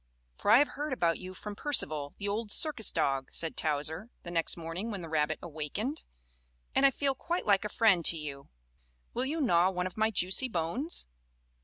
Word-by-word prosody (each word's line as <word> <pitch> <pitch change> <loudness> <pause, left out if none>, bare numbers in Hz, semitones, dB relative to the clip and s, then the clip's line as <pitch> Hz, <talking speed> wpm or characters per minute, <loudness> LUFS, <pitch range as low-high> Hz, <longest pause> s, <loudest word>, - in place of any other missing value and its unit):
"For - - -3
I 220 - +8
have 290 +2 +3
heard 295 0 -4
about 170 -9 0
you 185 0 -9
from 210 +1 -7
Percival, 155 - +2
the 200 - -5
old 210 +2 -2
circus 285 - +2
dog," 135 -1 0
said 165 -1 -2
Towser, 155 +7 +1
the 175 - -7
next 165 0 0
morning 170 +6 -5
when 200 -4 -5
the 165 - -8
rabbit 155 0 0
awakened, 175 - -4 0.7
"and 275 - +5
I - - +5
feel 275 +1 -1
quite 340 +7 -3
like 200 -2 +3
a - - -2
friend 200 -6 +3
to 165 - +6
you. 140 -3 -8 0.6
Will 250 - -1
you 310 +5 -3
gnaw 180 - +3
one 180 -1 -2
of 185 - -6
my 220 0 +2
juicy 190 +5 +3
bones?" 220 - -2
190 Hz, 195 wpm, -30 LUFS, 165-240 Hz, 0.7 s, I